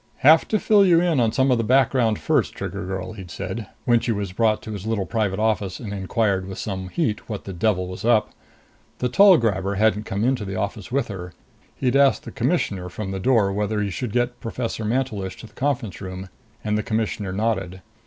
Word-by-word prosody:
"Have 155 +4 +6
to 215 - +2
fill 210 0 +4
you 175 -3 +5
in 170 -5 +2
on 115 -2 +3
some 130 +3 +2
of 125 - +3
the - - +1
background 125 -2 +3
first, - - 0
Trigger - - -5
girl," 95 0 -4
he'd 95 -4 -10
said, 110 +4 -5 0.2
when 120 -1 +4
she 115 - -1
was 100 -3 -2
brought 110 +2 +2
to 110 - -7
his 105 0 -6
little 110 -4 0
private 105 -4 -1
office 105 -4 0
and 105 -4 -6
inquired 95 -1 0
with 95 - -7
some 95 -3 -4
heat 115 - -2
what 105 -3 -4
the 95 - -7
devil 90 0 +1
was 90 - -7
up. 115 -2 +3 0.7
The 125 - -1
tall 195 +6 +7
grabber 100 -3 0
hadn't 105 0 +2
come 100 +2 -2
into 125 -2 +1
the 95 -1 -5
office 100 +2 -4
with 135 -1 0
her. 90 -3 -7 0.4
He 130 -1 0
asked 140 -1 +4
the - - -8
Commissioner 115 - -1
from 95 +2 -5
the 95 - -3
door 105 -2 +3
whether 105 +1 -1
he 100 -1 -1
should 115 +5 -4
get 120 +1 -1
Professor 115 -1 -4
Mantelish 110 -5 -2
to - - -10
the 110 - -16
conference 130 -8 -2
room, 95 0 -7 0.3
and 105 -1 0
the 105 - +1
Commissioner 110 -3 -2
nodded. 95 -3 -2
110 Hz, 215 wpm, -23 LUFS, 95-120 Hz, 0.7 s, tall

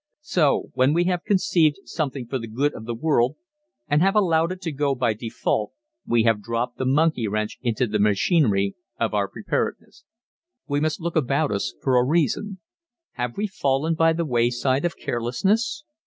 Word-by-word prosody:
So, 160 - +1
when 130 +3 +3
we 175 - +3
have 180 -1 -1
conceived 170 -6 +3
something 135 -5 -3
for 130 +3 -3
the 115 - -6
good 135 +7 0
of 110 - -9
the 120 0 -3
world 130 -1 +1 0.5
and 145 +1 +2
have 195 +3 +3
allowed 170 -4 +3
it 185 - -5
to 165 - -3
go 140 -1 0
by 120 -3 +1
default 110 -1 -2 0.3
we 120 -1 +3
have 115 -2 +2
dropped 115 +3 -3
the 130 - -1
monkey 145 -4 +2
wrench 110 +1 -3
into 120 0 0
the 105 -2 -1
machinery 100 - +2 0.3
of 115 -1 0
our 100 -1 +1
preparedness. - - -4 0.6
We 145 0 0
must 155 +2 -1
look 170 0 -3
about 145 0 +1
us 80 -13 -2
for 130 -1 +3
a - - +3
reason. 170 - 0 0.5
Have 120 -1 -4
we 205 - 0
fallen 155 -5 0
by 165 0 +3
the 165 +1 -1
wayside 125 +2 +1
of 170 - -2
carelessness? 200 - -1
135 Hz, 180 wpm, -23 LUFS, 115-165 Hz, 0.6 s, when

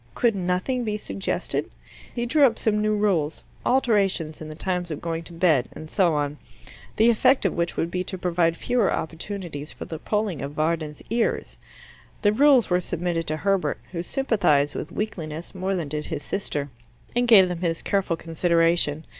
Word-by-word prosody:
Could 235 -4 +2
nothing 185 +7 -1
be 210 -2 -1
suggested? 100 - -3 0.4
He 240 - -2
drew 290 +5 +3
up 230 - -2
some 210 -1 +1
new 215 0 +2
rules 180 -8 0 0.2
alterations 195 - +1
in 155 - -7
the 155 - -7
times 180 +1 -2
of 155 - -4
going 165 -1 -3
to - - -11
bed, 165 -7 +2
and 155 0 -10
so 175 -5 +3
on 145 0 -2 0.6
the 230 +2 +5
effect 255 +2 +3
of 195 - +2
which 170 0 -2
would 165 - -1
be 180 0 -1
to 190 - -5
provide 170 -2 +1
fewer 245 -4 +1
opportunities 165 -2 -4
for - - -8
the 160 - -6
pulling 210 -4 -1
of 140 +1 -5
Varden's 155 -1 -1
ears. 230 0 -1 0.6
The 205 0 +4
rules 270 0 +5
were 180 0 +2
submitted 170 -1 -2
to 155 - -1
Herbert, 195 +4 0
who 170 -2 -3
sympathized 180 - +1
with 155 - -5
weakliness 170 -6 -5
more 190 +1 -1
than 170 -5 -2
did 150 0 -3
his 155 -4 -4
sister, 145 -8 -3 0.4
and 245 0 +2
gave 200 -6 +8
them 180 -1 -4
his 165 -2 -1
careful 195 -4 0
consideration. 165 -2 +1
175 Hz, 180 wpm, -24 LUFS, 160-210 Hz, 0.6 s, gave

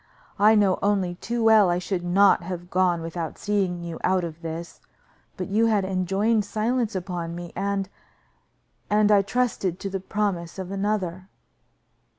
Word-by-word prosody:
I 215 +2 +6
know 200 -3 +3
only 195 -3 +1
too 230 +6 -3
well 220 -4 +6
I 175 - +1
should 180 0 -3
not 190 +2 +4
have 175 0 -7
gone 180 -2 +2
without 165 -1 -5
seeing 190 -4 -1
you 170 -1 -6
out 185 -1 +2
of 165 -1 -6
this, 165 +1 -7 0.6
but 185 - -4
you 215 +3 +2
had 210 -4 +2
enjoined 195 +4 +1
silence 225 +2 -1
upon 175 -2 -4
me, 175 0 -8
and 195 0 -1 1.0
and 210 0 +3
I 205 -1 +6
trusted 200 -4 -1
to 195 - -5
the 195 - -2
promises 190 -3 -2
of 190 -1 -6
another." 195 -2 -2
190 Hz, 160 wpm, -25 LUFS, 175-205 Hz, 1.0 s, I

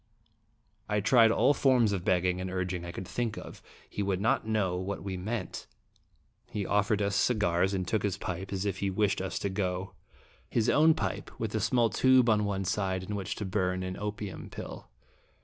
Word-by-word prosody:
I 105 0 +2
tried 115 +2 +5
all 125 +5 +4
forms 125 -7 +3
of 95 -3 -2
begging 90 0 +1
and 95 - -3
urg 90 0 -2
ing 90 -1 -4
I 85 - -6
could 90 +1 -7
think 115 -1 -2
of. - - -9 0.3
He - - -4
would 95 -2 0
not 110 +1 +1
know 105 -5 +1
what 95 +2 -4
we 95 -1 -4
meant. 95 +1 -4 0.8
He 105 -2 -3
offered 105 +1 +1
us 100 0 0
cigars, 95 -4 +2
and 95 -1 -2
took 110 - +1
his 100 -2 -1
pipe, 95 0 -5
as 95 0 -2
if 100 -1 -2
he 100 - 0
wished 100 0 +1
us 95 - -3
to 100 - -1
go 95 -1 -2 0.6
his 115 0 +2
own 155 +1 +5
pipe, - - -3
with - - -3
a - - +1
small 120 -3 +2
tube 130 -2 +5
on 105 -1 +2
one 95 -1 -2
side, 95 -1 -1
in 105 +3 -4
which 95 -2 -3
to 105 - -4
burn 95 -1 -1
an 95 0 -4
opium 105 -1 -5
pill. - - -8
100 Hz, 200 wpm, -29 LUFS, 95-110 Hz, 0.8 s, tried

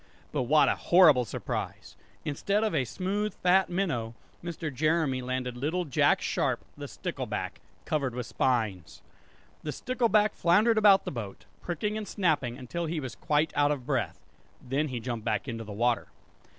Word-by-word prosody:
But 145 -4 0
what 155 0 +6
a - - +4
horrible 155 -9 +5
surprise! - - -5 0.3
Instead 200 +8 0
of 220 - 0
a 130 - +1
smooth 200 - -2
fat 185 +1 +3
minnow, 160 -12 -1 0.3
Mr. 165 -3 -4
Jeremy 155 -1 +1
landed 125 0 -3
little 160 +8 -1
Jack 140 - +2
Sharp - - -1
the - - -7
stickleback, - - -4 0.2
covered 140 -5 -1
with 125 -2 -3
spines! 110 -10 -1 0.6
The 150 - -4
stickleback 220 - +2
floundered 215 +6 +4
about 200 -2 +6
the - - -3
boat, 110 -6 -7 0.2
pricking 210 +5 -2
and 210 - -6
snapping 145 - 0
until 165 +7 -4
he 160 0 -2
was 130 -5 -5
quite 150 +4 0
out 145 0 +3
of 140 -4 -2
breath. 125 - -1 0.4
Then 135 +4 -1
he 125 -4 -4
jumped 115 -2 -4
back 110 +3 -1
into 115 -2 -4
the 105 - -9
water. 120 +3 +1
150 Hz, 165 wpm, -28 LUFS, 125-180 Hz, 0.6 s, what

